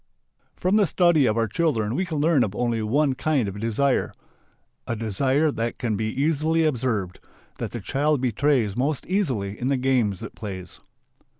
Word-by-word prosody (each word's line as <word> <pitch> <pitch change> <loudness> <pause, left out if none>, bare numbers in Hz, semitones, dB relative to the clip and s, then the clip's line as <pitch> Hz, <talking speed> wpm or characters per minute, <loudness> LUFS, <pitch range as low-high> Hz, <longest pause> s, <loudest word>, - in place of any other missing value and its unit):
From 185 +3 +1
the 205 -3 +4
study 170 -7 +3
of 110 - +1
our 115 -1 +2
children 115 -3 0
we 185 +8 0
can 160 -3 -3
learn 150 -3 +3
of 100 -1 -3
only 120 -2 0
one 135 +6 +2
kind 135 -3 0
of 100 +1 -6
desire. 115 +5 0 0.7
A 115 - -1
desire 130 +8 +1
that 115 -2 -3
can 115 -3 -1
be 110 +2 -2
easily 155 +5 +1
observed, 115 - -1 0.4
that - - -3
the - - -6
child 145 +1 +1
betrays 125 -3 +1
most 135 +3 -1
easily 125 - -1
in 125 - -2
the 135 0 +2
games 125 -7 +1
it - - -7
plays. 95 -4 -8
130 Hz, 175 wpm, -24 LUFS, 110-150 Hz, 0.7 s, the